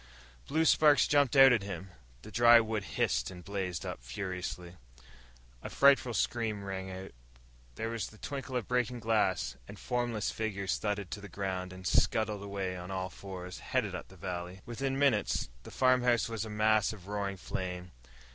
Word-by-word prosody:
Blue 160 +3 +2
sparks 150 -2 +6
jumped 145 -3 +3
out 135 -2 +9
at 115 - +2
him. 95 -1 -6 0.3
The - - -10
dry 120 0 +7
wood 110 -3 -2
hissed - - +1
and 90 -2 -11
blazed 95 -3 -3
up - - -5
furiously. 90 +5 -5 0.9
A - - -6
frightful 135 -4 +4
scream 110 -4 -1
rang 95 -1 -5
out. 95 +1 -7 0.6
There 115 - -3
was 115 -1 -3
the 110 - -14
tinkle 135 +1 -5
of 120 -4 -1
breaking 125 -1 0
glass. 95 - +1 0.2
Formless 120 -4 -1
figures 100 -3 -2
thudded 105 -3 -2
to 105 - -5
the 100 - -9
ground 95 0 -3
and 95 0 -10
scuttled 105 +2 +2
away 100 -2 -3
on 90 0 -7
all 95 -1 -3
fours, 90 -2 -8
headed - - -1
up - - -6
the - - -16
valley. 90 0 -5
Within 135 +3 -2
minutes 130 - +2
the - - -11
farmhouse 125 -2 +3
was 115 -2 -3
a - - -7
mass 105 0 +2
of 95 -4 -12
roaring 100 -1 -3
flame. 90 -1 -5
100 Hz, 170 wpm, -31 LUFS, 95-120 Hz, 0.9 s, out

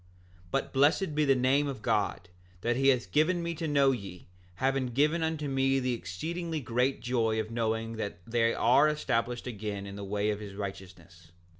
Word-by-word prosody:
7:4 90 - -29 0.4
But - - -2
blessed 150 +5 +3
be 150 0 +2
the 135 -1 +4
name 130 +3 +2
of 130 -6 -6
God, 100 -3 0 0.3
that 120 +3 +1
he 135 +2 +2
hath 130 -3 +2
given 170 +4 +2
me 170 0 -2
to 165 0 -4
know, 140 -2 +4
yea, 95 -8 -6 0.3
hath 130 +2 0
given 155 +4 +3
unto 160 -2 -1
me 135 0 +2
the 130 -1 0
exceedingly 160 - -4
great 125 +1 0
joy 115 -3 0
of 110 +1 -3
knowing 115 0 -2
that 100 -4 -4
they 115 0 +2
are 130 +6 +5
established 125 -5 -1
again 105 -4 -5
in 100 0 -8
the 100 - -6
way 105 +2 0
of 105 - -3
his 100 -2 -8
righteousness. 90 -4 -9
125 Hz, 190 wpm, -29 LUFS, 105-140 Hz, 0.4 s, are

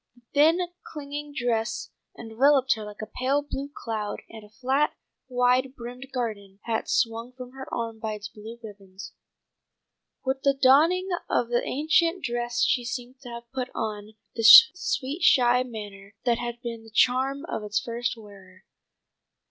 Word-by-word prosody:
The 245 - -23
thin, 310 +4 +5 0.2
clinging 295 0 -7
dress 230 -2 -2 0.3
enveloped 260 +4 +3
her 220 - -7
like 210 0 -8
a 215 - -11
pale 275 +3 +1
blue 280 0 -5
cloud, 215 -6 -5
and 220 -1 -10
a 210 - -15
flat, 260 +7 0 0.3
wide 250 +1 +1
brimmed 250 +2 -9
garden 210 -6 -4
hat 225 -1 -2
swung 230 +1 0
from 250 -1 -10
her 265 0 -10
arm 230 -1 -4
by 220 -1 -3
its 210 -1 -7
blue 220 +2 -11
ribbons. 200 -2 -11 1.1
With 265 0 -1
the 275 0 +2
donning 310 +8 +4 0.2
of 235 - +1
the 240 0 +1
ancient 330 +5 +1
dress 240 0 -1
she 245 - +2
seemed 250 +1 -6
to 250 - -11
have 235 0 -9
put 255 -1 -3
on 215 -1 -5 0.2
the 230 - -4
sweet 300 - +7
shy 250 -1 +5
manner 205 -5 -8
that 235 -2 +2
had 240 0 -5
been 230 -2 -6
the 225 - -14
charm 260 +6 +2
of 220 - -4
its 210 0 -1
first 235 +2 -3
wearer. 195 -3 -15
240 Hz, 160 wpm, -26 LUFS, 220-265 Hz, 1.1 s, sweet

